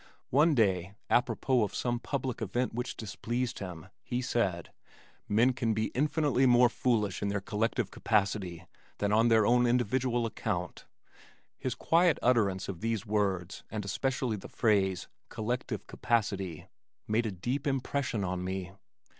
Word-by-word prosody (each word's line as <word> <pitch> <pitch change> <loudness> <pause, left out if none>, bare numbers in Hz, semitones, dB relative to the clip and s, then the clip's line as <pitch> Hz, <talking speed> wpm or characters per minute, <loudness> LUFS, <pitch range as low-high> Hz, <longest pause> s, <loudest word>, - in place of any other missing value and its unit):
One 150 +4 +5
day, 95 -4 +1 0.2
apropos 125 +1 +2
of 105 -2 -1
some 120 -1 -1
public 130 -2 -3
event 120 +4 -1
which 125 +2 -4
displeased 120 +3 -3
him, 90 -5 -7 0.2
he 120 - -3
said, 100 - -1 0.6
"Men 115 +5 +4
can 115 -3 0
be 110 0 -1
infinitely 145 -1 +2
more 120 0 +6
foolish 110 -6 0
in 100 - 0
their 100 0 0
collective 110 +2 -1
capacity 100 -5 0 0.3
than 100 0 0
on 115 +2 +5
their 110 -2 +5
own 120 +1 +4
individual 120 0 +1
account." 90 -5 -3 0.7
His 130 -2 -2
quiet 170 +5 +3
utterance 105 -7 +2
of 95 -4 -6
these 115 -2 -1
words 95 -4 -1
and 105 -2 -4
especially 125 +2 -1
the 95 - -10
phrase 95 -5 +1 0.2
"collective 120 +2 -3
capacity" 100 -8 -1 0.4
made 110 +2 +1
a - - -2
deep 125 - -3
impression 135 -5 -1
on 90 -1 -2
me. 95 -1 -4
115 Hz, 145 wpm, -30 LUFS, 100-125 Hz, 0.7 s, more